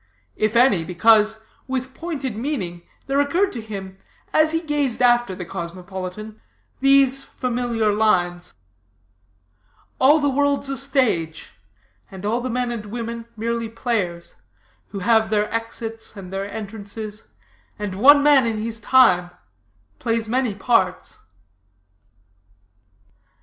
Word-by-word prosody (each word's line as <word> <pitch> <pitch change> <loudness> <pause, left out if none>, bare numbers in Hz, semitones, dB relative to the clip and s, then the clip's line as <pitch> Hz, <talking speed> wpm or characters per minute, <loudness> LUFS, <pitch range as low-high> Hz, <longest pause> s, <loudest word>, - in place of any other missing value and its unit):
If 215 +1 0
any, 235 -8 +4
because, 220 +5 +3 0.3
with 260 0 -3
pointed 280 -9 -4
meaning, 210 - -4 0.2
there 275 +1 0
occurred 340 +8 +2
to 235 - -6
him, 195 -3 -8 0.3
as 310 0 +4
he 325 - +1
gazed 295 -6 -1
after 240 -5 +3
the 180 - -7
cosmopolitan, 185 +5 -7 0.4
these 275 0 +4
familiar 240 -4 -1
lines: 180 -5 0 1.4
"All 290 +4 +6
the 290 - +1
world's 280 0 +1
a 275 - -2
stage, 240 - 0 0.6
And 190 0 -9
all 230 +4 0
the 255 - -3
men 245 0 -1
and 220 -3 -6
women 230 +1 -5
merely 230 +1 -2
players, 210 -8 -3 0.5
Who 200 - -8
have 220 +2 +3
their 210 0 0
exits 225 -1 -4
and 190 -1 -9
their 195 +1 -4
entrances, 215 0 -7 0.5
And 205 -2 -4
one 285 +8 +6
man 285 -4 +5
in 225 -1 -1
his 225 +1 -4
time 185 -7 +4 0.7
plays 230 -1 -1
many 245 -2 0
parts." 230 +4 0
225 Hz, 125 wpm, -22 LUFS, 205-260 Hz, 1.4 s, All